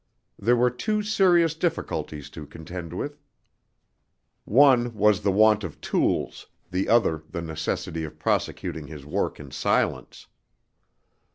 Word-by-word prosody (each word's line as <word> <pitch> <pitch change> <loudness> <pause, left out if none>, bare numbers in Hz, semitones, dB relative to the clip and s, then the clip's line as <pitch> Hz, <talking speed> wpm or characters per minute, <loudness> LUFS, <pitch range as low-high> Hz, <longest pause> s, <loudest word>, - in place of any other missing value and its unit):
There 120 +5 +3
were 125 +1 +3
two 210 - -1
serious 180 -6 +3
difficulties 155 - -3
to 75 -3 -9
contend 85 +2 -8
with; 145 +11 -5 1.2
one 120 -1 +4
was 105 -1 +3
the 100 -1 +1
want 110 +1 +4
of 85 -5 -7
tools, - - -1 0.2
the 90 +2 -1
other 100 -9 +3
the 85 -2 -5
necessity 80 0 -3
of 75 - -8
prosecuting 75 -3 -2
his 75 -2 -10
work 75 - -2
in - - -10
silence. - - -1
105 Hz, 125 wpm, -25 LUFS, 80-130 Hz, 1.2 s, one